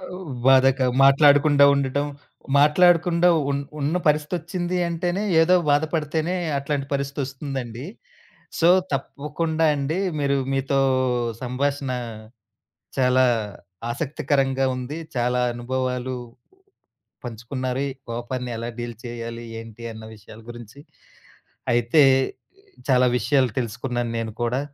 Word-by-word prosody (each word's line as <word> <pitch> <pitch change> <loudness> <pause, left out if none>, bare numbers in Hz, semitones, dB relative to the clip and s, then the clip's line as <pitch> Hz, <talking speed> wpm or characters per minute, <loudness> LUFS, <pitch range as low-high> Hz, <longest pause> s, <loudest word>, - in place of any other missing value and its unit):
ఓహ్, 185 -2 -8 0.2
బాధక 135 0 +5 0.2
మాట్లాడకుండా 145 +1 +6
ఉండటం. 140 +1 0 0.5
మాట్లాడకుండా 170 +3 +4 0.2
ఉన్ 140 0 -1 0.2
ఉన్న 145 +4 -1
పరిస్థితొచ్చిందంటేనే 175 +3 -1 0.2
ఏదో 180 +3 +5 0.2
బాధపడితేనే 155 +3 0 0.2
అట్లాంటి 140 0 -2
పరిస్థితొస్తుందండి. 135 -3 -4 0.8
సో, 170 - +5 0.2
తప్పకుండా 155 +4 -2
అండి, 145 +4 -2 0.2
మీరు 140 -1 +1 0.2
మీతో 135 0 0 0.6
సంభాషణ 135 +2 -2 1.1
చాలా 130 0 +4 0.7
ఆసక్తికరంగా 135 -1 0
ఉంది. 130 +5 -5 0.2
చాలా 125 +1 +1
అనుభవాలు 130 +1 -3 1.1
పంచుకున్నారు. 125 +3 -4
ఈ - - -5 0.2
కోపాన్ని 120 +1 -4
ఎలా 115 +1 -4
డీల్ 120 -2 -5
చేయాలి, 115 0 -6 0.2
ఏంటి? 115 0 -12
అన్న 110 0 -10
విషయాల 110 +1 -14
గురించి. 120 +3 -11 0.9
అయితే 120 +6 +4 0.3
ఆహ్, 395 0 -29 0.2
చాలా 125 0 +5
విషయాలు 130 +2 +2
తెలుసుకున్నాను 120 0 -3
నేను 110 -1 -4
కూడా. 120 +3 0
135 Hz, 95 wpm, -23 LUFS, 125-150 Hz, 1.1 s, మాట్లాడకుండా